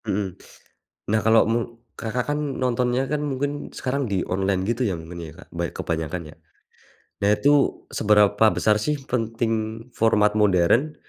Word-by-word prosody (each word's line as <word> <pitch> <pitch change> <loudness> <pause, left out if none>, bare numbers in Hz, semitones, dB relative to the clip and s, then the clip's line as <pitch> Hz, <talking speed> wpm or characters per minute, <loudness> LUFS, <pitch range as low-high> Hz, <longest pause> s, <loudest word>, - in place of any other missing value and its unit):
Mhm, 95 -2 -1 0.8
nah, 110 - +3
kalau 115 0 +6
me 120 - +2 0.4
Kakak 115 +2 -2
kan 150 - -2 0.2
nontonnya 125 0 +1
kan 150 -1 0
mungkin 145 0 -3
sekarang 140 +2 -1
di 95 -2 0
online 95 0 0
gitu 120 +2 -1
ya - - -1
namanya, 80 +1 -9
Kak, - - -35
ban 85 0 -1
kebanyakan 80 +1 -3
ya. - - -27 0.9
Nah - - +4
itu 145 - +3 0.4
seberapa 105 -1 +3 0.2
besar 105 - +3
sih 150 +7 0 0.2
penting 115 -1 0 0.5
format 105 -2 +3
modern, 105 - +3
110 Hz, 145 wpm, -23 LUFS, 95-125 Hz, 0.9 s, kalau